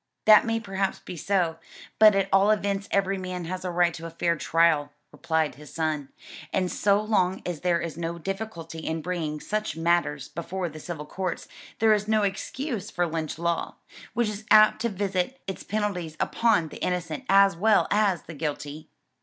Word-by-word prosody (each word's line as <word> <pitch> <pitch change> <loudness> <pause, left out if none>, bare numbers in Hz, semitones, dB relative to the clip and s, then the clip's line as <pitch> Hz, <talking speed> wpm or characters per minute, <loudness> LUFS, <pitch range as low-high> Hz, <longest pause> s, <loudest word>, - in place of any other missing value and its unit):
"That 215 +1 +7
may 225 0 +1
perhaps 195 -3 -2
be 180 - -9
so, 175 -2 0 0.4
but 215 -1 +8
at 195 -1 +2
all 195 +2 +5
events 200 -1 0
every 195 -1 +1
man 185 -1 -5
has 185 +2 -5
a 185 - -2
right 175 -1 +2
to 165 0 -7
a - - -7
fair 170 +1 0
trial," 155 -2 +2 0.2
replied 160 -3 -1
his 150 +1 -13
son, 155 -4 -2 0.4
"and 185 -2 0
so 200 0 +3
long 200 -3 0
as 175 -4 -4
there 175 -1 +2
is 165 -2 -5
no 170 0 -3
difficulty 170 -3 -5
in 160 0 -3
bringing 160 -4 -3
such 210 -2 -3
matters 165 -4 +1
before 175 +1 -4
the 155 0 -10
civil 155 -1 -6
courts, 185 +3 -4 0.3
there 220 -1 +5
is 210 0 0
no 215 -1 +2
excuse 210 +3 -3
for 175 - 0
Lynch 160 -2 -3
law, 170 0 -2 0.4
which 240 -1 +2
is 210 0 -6
apt 215 0 +6
to 235 - +1
visit 195 +4 -2
its 190 - -5
penalties 185 -7 -3
upon 225 -9 +2
the - - -9
innocent 170 -4 -2
as 195 -1 +6
well 210 +4 +3
as 200 -5 +2
the 165 - -9
guilty." 150 0 -5
180 Hz, 185 wpm, -26 LUFS, 165-200 Hz, 0.4 s, but